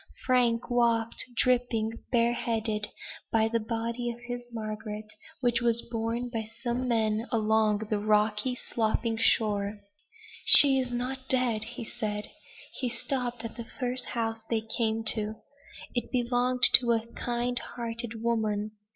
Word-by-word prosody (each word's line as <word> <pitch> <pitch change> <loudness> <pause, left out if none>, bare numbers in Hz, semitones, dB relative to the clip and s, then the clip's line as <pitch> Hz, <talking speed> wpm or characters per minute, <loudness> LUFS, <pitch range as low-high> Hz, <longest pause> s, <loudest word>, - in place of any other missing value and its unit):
Frank 245 -2 +2
walked, 235 -1 +1
dripping, 240 -3 +1 0.2
bareheaded, 230 -3 +1 0.4
by 220 -1 +3
the 230 +1 0
body 230 +2 -3
of 235 0 -6
his 245 0 -6
Margaret, 215 -1 -5 0.4
which 240 -1 +2
was 235 -1 +1
borne 230 +1 -3
by 225 -3 -4
some 245 +1 -1
men 220 -1 0
along 220 -2 +2
the 210 - +1
rocky 210 +3 +1
sloping 225 -1 -1
shore. 210 -2 +1 0.6
"She 275 -2 +8
is 255 -1 -2
not 260 +2 -4
dead!" 240 -4 +2
he 235 +1 -7
said. 210 -3 -4 0.4
He 255 - -2
stopped 245 -1 -2
at 230 - -7
the 235 - -5 0.2
first 250 0 0
house 225 -1 -3
they 225 -2 +1
came 225 0 -1
to. 215 0 -3 0.6
It 240 -2 -3
belonged 250 0 0 0.2
to 240 -1 +1
a 225 0 -1
kind 245 0 -1
hearted 230 -1 -4
woman. 215 -2 0
230 Hz, 135 wpm, -28 LUFS, 220-245 Hz, 0.6 s, She